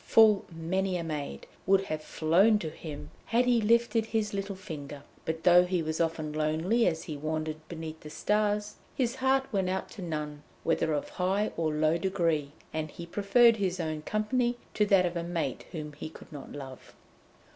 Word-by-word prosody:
Full 215 -3 +5
many 180 +3 -1
a 170 - -3
maid 150 -3 -4 0.2
would 195 0 +5
have 155 -4 -3
flown 180 +9 +3
to 160 -7 -4
him 150 -3 -8 0.2
had 240 +2 +3
he 245 -2 +3
lifted 230 0 +3
his 220 -2 -1
little 195 0 -3
finger, 145 -7 -8 0.2
but 160 0 -3
though 180 0 +7
he 180 -2 0
was 160 +1 -1
often 160 -2 -1
lonely 160 +10 +2
as 165 -2 0
he 160 -4 -5
wandered 155 +1 -2
beneath 160 -1 -6
the 150 - -10
stars, 210 +4 0 0.2
his 255 -1 0
heart 265 +1 +2
went 190 -2 +1
out 190 +1 -2
to 200 - -9
none, 150 -3 -4 0.2
whether 165 -1 +1
of 145 - -1
high 195 +3 0
or 160 -2 0
low 155 +2 +2
degree, 165 -6 0 0.2
and 155 0 -2
he 170 - -8
preferred 210 +6 +4
his 190 -3 -1
own 155 -2 -2
company 240 +7 0 0.2
to 210 -1 +2
that 195 -3 +5
of 175 0 -2
a 170 - -1
mate 170 -1 -3
whom 150 -3 -6
he 150 - -7
could - - -14
not 145 - -8
love. 135 -3 -9
175 Hz, 190 wpm, -29 LUFS, 155-210 Hz, 0.2 s, though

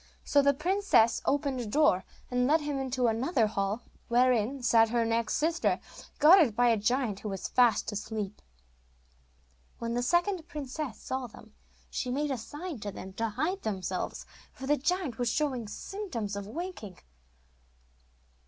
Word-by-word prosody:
So 285 - +4
the 280 0 +3
princess 320 - +3
opened 280 -2 0
a - - -4
door, 210 -6 +3 0.3
and 250 0 +2
led 310 +3 +4
him 290 -2 -2
into 260 -1 -1
another 235 +3 +2
hall, 205 +2 -2 0.2
wherein 245 +1 +2
sat 225 -2 +5
her 235 0 +1
next 230 0 0
sister, 325 +2 +1 0.4
guarded 305 - +6
by 245 +1 +4
a 230 - +4
giant 220 -1 0
who 210 - -5
was 195 -2 -4
fast 240 -4 +3
asleep. 210 -1 -5 1.4
When 230 0 -3
the 245 - 0
second 345 +5 +1
princess 280 -3 -5
saw 260 -1 -4
them, 220 -1 -15 0.4
she 250 - -2
made 285 +3 -1
a 265 - -1
sign 295 +4 -7
to 205 0 -5
them 190 0 -9
to 225 +3 -1
hide 350 - -2
themselves, 190 -3 -3 0.3
for 265 - -9
the 295 +2 +3
giant 310 -4 -1
was 245 -1 +1
showing 260 -4 -1
symptoms 230 - -5
of 200 0 -5
waking. 255 - -6
250 Hz, 155 wpm, -29 LUFS, 220-295 Hz, 1.4 s, guarded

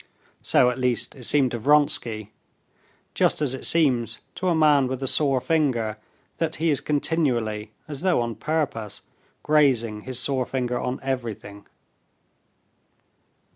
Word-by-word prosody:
So 125 - +3
at 125 - -6
least 125 +1 0
it 130 -3 -9
seemed 135 -2 +3
to 120 - -3
Vronsky, 120 -6 +1 0.8
just - - +2
as 145 -4 0
it 130 - -3
seems 130 -8 +2 0.2
to 185 - -3
a 170 - +2
man 150 -4 +4
with 130 +1 -4
a - - -1
sore 135 -1 +2
finger 125 -8 0 0.4
that 160 -1 -1
he 160 +1 +1
is 140 - 0
continually, 125 -9 0 0.2
as 145 -2 -7
though 185 -5 +2
on 120 -1 -2
purpose, 140 -8 -3 0.4
grazing 125 -8 +2
his 130 +2 -4
sore 130 -1 -1
finger 125 -2 -2
on 125 +1 -3
everything. 115 -6 -5
130 Hz, 140 wpm, -24 LUFS, 120-150 Hz, 0.8 s, man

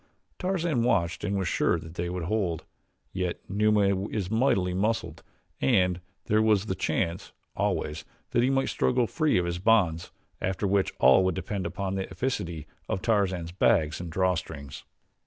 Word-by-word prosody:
Tarzan 175 -8 0
watched 100 -9 +1
and 100 -1 -1
was 95 -2 -1
sure 85 - +2
that 80 0 -9
they 85 0 -3
would 90 -1 -3
hold, 90 -4 -1 0.5
yet 90 -1 -2
Numa 100 -1 +2
is 100 -3 -3
mightily 105 -6 +2
muscled 95 -4 -1 0.4
and 90 -7 +2 0.2
there 105 +1 +3
was 105 -2 +3
the 95 - -1
chance, 85 -1 -2 0.2
always, 75 +1 -1 0.3
that 120 - +3
he 125 - +3
might 135 0 +1
struggle 125 -1 +1
free 155 - +1
of 90 - +1
his 85 0 -2
bonds 90 -6 +2 0.3
after 95 +2 -1
which 100 0 +2
all 65 +9 +6
would 95 -2 +1
depend 95 0 -3
upon 95 +3 -3
the 95 -1 -3
efficacy 85 - -3 0.2
of 95 - -2
Tarzan's 95 -6 +1
bags 90 -5 +2
and 85 -2 -6
draw 95 +1 +2
strings. 70 -4 -7
95 Hz, 165 wpm, -27 LUFS, 85-110 Hz, 0.5 s, all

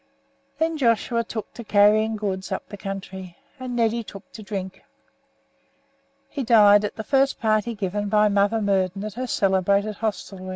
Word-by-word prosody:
Then 320 -1 -1
Joshua 235 -1 +1
took 220 -1 -7
to 235 - -9
carrying 215 +1 +3
goods 195 -2 -4
up 190 - -4
the - - -7
country, 190 -2 -7 0.2
and 255 -1 -5
Neddy 230 0 +1
took 195 -2 -12
to 220 - -10
drink. 195 -3 -6 1.5
He 280 - -5
died 210 -3 +6
at 210 - -3
the 220 - -5
first 270 +3 +1
party 220 +1 0
given 205 0 -3
by 210 0 +4
Mother 205 +2 +2
Murden 195 -1 0
at 215 -1 -5
her 255 +4 -4
celebrated 200 0 +1
hostelry. 195 -3 -4
210 Hz, 160 wpm, -23 LUFS, 195-225 Hz, 1.5 s, died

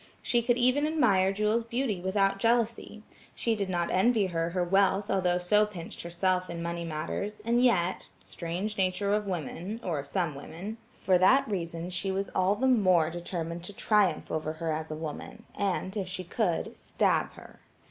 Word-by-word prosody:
She 240 - +2
could 240 +1 +2
even 255 +4 +3
admire 210 -12 +3
Jewel's 210 +3 +1
beauty 230 -4 -2
without 195 +1 +1
jealousy; 230 -1 0 0.3
she 230 -1 0
did 200 -3 -2
not 175 -2 -1
envy 215 +2 +3
her 165 -2 -1
her 180 +1 0
wealth 195 +2 +2
although 180 -2 +2
so 210 +4 +3
pinched 175 -5 -8
herself 180 +2 0
in 170 0 -5
money 170 0 -3
matters, 170 +6 -4
and 240 +1 +3
yet–strange 185 -1 -1
nature 190 +2 +1
of 210 -1 0
women, 180 - -4
or 165 -5 -1
of 140 - -7
some 165 +1 -1
women–for 185 +5 -3
that 265 +9 +5
reason 170 -3 -4
she 185 +2 -2
was 195 +1 -2
the 200 +7 +2
more 185 -10 +4
determined 170 -1 -5
to 205 - -7
triumph 200 -6 +1
over 155 0 -2
her 160 0 -3
as 155 +1 -4
a 155 - -4
woman, 160 +8 -7
and, 195 -1 -1
if 195 -3 -2
she 185 0 -4
could, 180 -1 -1
stab - - 0
her. - - -14
190 Hz, 170 wpm, -29 LUFS, 170-210 Hz, 0.3 s, that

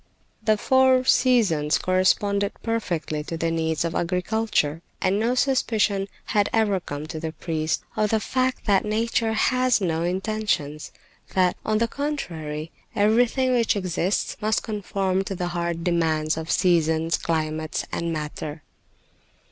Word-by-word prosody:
The 215 -1 +3
four 260 +2 +4
seasons 200 - +3
corresponded 200 +2 +1
perfectly 170 -9 -2
to 165 - -4
the 165 0 0
needs 160 0 0
of 165 - -2
agriculture, 180 -3 0 0.2
and 195 +2 +1
no 235 +3 +1
suspicion 220 -7 +1 0.2
had 205 -1 +1
ever 210 -4 +2
come 145 -3 -6
to 155 0 -6
the 160 0 -4
priest 160 -2 -2
of 210 -1 +1
the 220 - +2
fact 255 +3 -1
that 200 -3 +3
nature 225 +1 0
has 255 +2 +2
no 165 -4 -1
intentions; 180 -5 -2 0.4
that, 185 -1 +3
on 215 0 +1
the 230 +1 +2
contrary, 165 - -4 0.2
everything 240 +5 +3
which 235 -3 +2
exists 185 0 -1
must 215 0 +1
conform 195 -3 -1
to 195 - -4
the 175 0 -2
hard 170 -1 -2
demands 160 -3 +1
of 160 +1 -6
seasons, 165 -3 +2
climates 155 -1 -2
and 170 0 -2
matter. 150 -1 -5
185 Hz, 140 wpm, -24 LUFS, 160-220 Hz, 0.4 s, four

